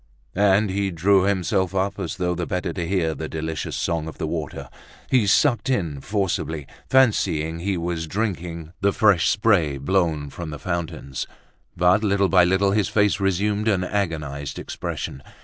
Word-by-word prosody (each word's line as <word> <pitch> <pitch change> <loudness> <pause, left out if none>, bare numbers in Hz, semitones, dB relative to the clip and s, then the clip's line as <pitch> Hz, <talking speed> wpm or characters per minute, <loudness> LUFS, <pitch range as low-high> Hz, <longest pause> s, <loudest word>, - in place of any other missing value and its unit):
And 100 +1 +3
he 100 0 0
drew 95 +2 +3
himself 95 -1 0
up, 100 +1 -1
as 95 0 -4
though 90 -1 0
the 90 -1 -3
better 90 -1 -2
to 85 -1 -3
hear 85 -4 +1
the 80 0 -6
delicious 80 0 -4
song 80 -2 -1
of 80 - -8
the - - -2
water; - - -4 0.4
he 125 -6 +4
sucked 130 +5 +3
in 85 - -1
forcibly, 85 -7 -2 0.2
fancying 85 -11 +2
he 95 +2 -1
was 85 -1 -3
drinking 85 -4 -3
the 100 0 +3
fresh 100 -6 +4
spray 100 -10 +2
blown 80 -2 0
from 85 -2 -6
the 75 - -6
fountains. 75 -4 -4 0.5
But, 90 +4 +4
little 100 -2 +2
by 90 -2 +6
little, 95 +2 +2
his 105 0 +1
face 105 -1 +2
resumed 100 +3 0
an 95 -4 +2
agonized 75 -8 -3
expression. 65 - -5
90 Hz, 165 wpm, -23 LUFS, 80-100 Hz, 0.5 s, by